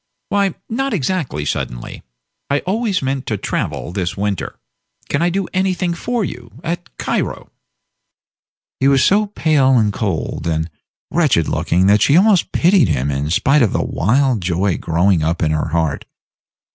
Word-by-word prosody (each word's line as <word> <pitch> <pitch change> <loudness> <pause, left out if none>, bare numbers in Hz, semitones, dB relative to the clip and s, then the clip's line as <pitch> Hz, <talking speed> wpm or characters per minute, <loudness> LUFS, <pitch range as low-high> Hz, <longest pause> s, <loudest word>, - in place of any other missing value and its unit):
"Why 200 -3 +1
not 270 +1 -1
exactly 140 - -2
suddenly. - - -4 0.5
I 140 0 +1
always 200 - -1
meant 135 0 -2
to 110 - -1
travel 90 - -3
this 90 -1 -3
winter. 100 -1 -3 0.5
Can 140 - 0
I 175 - +3
do 190 +1 -1
anything 185 -2 0
for 230 +5 -2
you 120 -6 -8
at 175 +1 -5
Cairo?" - - -3 1.3
He 135 - +3
was 140 -1 +4
so 210 +2 +3
pale, 150 -9 +2
and 105 -3 +2
cold, 95 -6 -3
and 80 0 -1 0.4
wretched 145 - +2
looking 90 +2 +1
that 105 +2 +4
she 145 - +5
almost 200 -1 +4
pitied 175 - +4
him 70 -1 0
in 70 +2 -2
spite 140 - +3
of 115 - +2
the - - 0
wild 125 +3 +1
joy 90 +1 0
growing 85 +1 +2
up 85 +3 0
in 75 - +1
her 75 -1 0
heart. 80 -2 -1
130 Hz, 160 wpm, -18 LUFS, -, 1.3 s, she